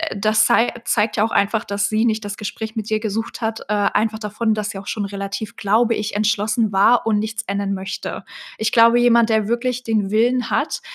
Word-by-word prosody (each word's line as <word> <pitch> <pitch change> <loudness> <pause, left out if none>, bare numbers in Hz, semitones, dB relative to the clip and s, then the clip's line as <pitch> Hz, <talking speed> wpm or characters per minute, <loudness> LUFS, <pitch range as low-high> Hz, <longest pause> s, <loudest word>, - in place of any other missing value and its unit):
das 215 +2 +3
zei 230 +3 +3
zeigt 210 -1 +1
ja 210 - +3
auch 225 - -1
einfach, 215 +2 +1
dass 200 0 -1
sie 220 +2 +1
nicht 220 -2 0
das 205 0 -5
Gespräch 220 +2 -6
mit 220 -1 -4
dir 215 0 +1
gesucht 220 +3 -4
hat, 225 0 -2
äh - - +1 0.3
einfach 220 0 -2
davon, 215 +1 -1
dass 210 -1 -3
sie 195 - -7
auch 200 - -12
schon 210 -2 -2
relativ, 200 +1 -5
glaube 225 +3 +2
ich, 210 0 -4
entschlossen 215 +1 +1
war 225 +6 +4
und 215 -2 +2
nichts 225 +1 -4
ändern 200 0 -2
möchte. 190 0 -5 0.3
Ich 220 0 -1
glaube, 230 0 +5
jemand, 235 -1 +4
der 220 -2 +1
wirklich 250 +2 -1
den 215 -3 0
Willen 245 +3 +1
hat, - - -1
215 Hz, 215 wpm, -20 LUFS, 205-225 Hz, 0.3 s, glaube